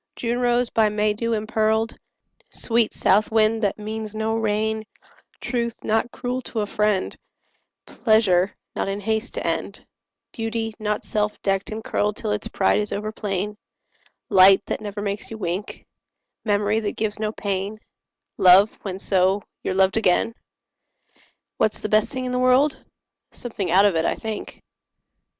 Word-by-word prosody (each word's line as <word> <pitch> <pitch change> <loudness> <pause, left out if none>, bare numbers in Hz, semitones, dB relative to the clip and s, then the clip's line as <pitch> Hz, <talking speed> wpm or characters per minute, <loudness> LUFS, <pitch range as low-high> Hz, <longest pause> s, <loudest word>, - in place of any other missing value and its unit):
June 240 +1 -2
rose, 245 0 +1
by 220 -1 +3
May 210 0 +1
dew 230 +2 -2
impearled; 220 +1 0 0.5
Sweet 230 -1 +2
south 210 +3 +2
wind, 220 0 +3
that 205 -3 0
means 215 0 -5
no 220 +1 -1
rain; 220 0 0 0.6
Truth, 235 -2 -3
not 225 +2 0
cruel 250 +1 -3
to 230 -3 -3
a - - 0
friend; 210 -2 0 0.7
Pleasure, 205 -4 +2 0.2
not - - -1
in 195 +1 -2
haste 220 +3 -2
to - - -3
end; - - -3 0.5
Beauty, 225 -1 -3
not 210 -1 -2
self 210 0 -1
decked 195 -1 0
and 220 +1 -5
curled 210 -1 0
Till - - -3
its 105 - -2
pride 95 - +2
is 210 0 -1
over 210 +1 -3
plain; 205 -1 -3 0.7
Light, 195 -1 +6
that - - -3
never 205 -1 -5
makes 200 0 -3
you 225 - -7
wink; 185 0 -4 0.6
Memory, 210 0 +1
that 210 -2 -4
gives 215 -1 -2
no 215 -1 -1
pain; 200 0 -3 0.6
Love, 190 +3 +6
when, 190 -2 -5
so, 190 +1 +2 0.2
you're 185 - -2
loved 190 +1 +3
again. 225 +2 +2 1.2
What's 215 - +1
the 215 - -4
best 215 0 +3
thing 255 -1 -4
in 250 - -2
the 250 - 0
world? 260 +3 +3 0.5
Something 210 -7 -2
out 190 +4 +5
of 200 -4 +3
it, 160 0 +1
I - - +1
think. 220 -1 -6
215 Hz, 160 wpm, -23 LUFS, 200-225 Hz, 1.2 s, Light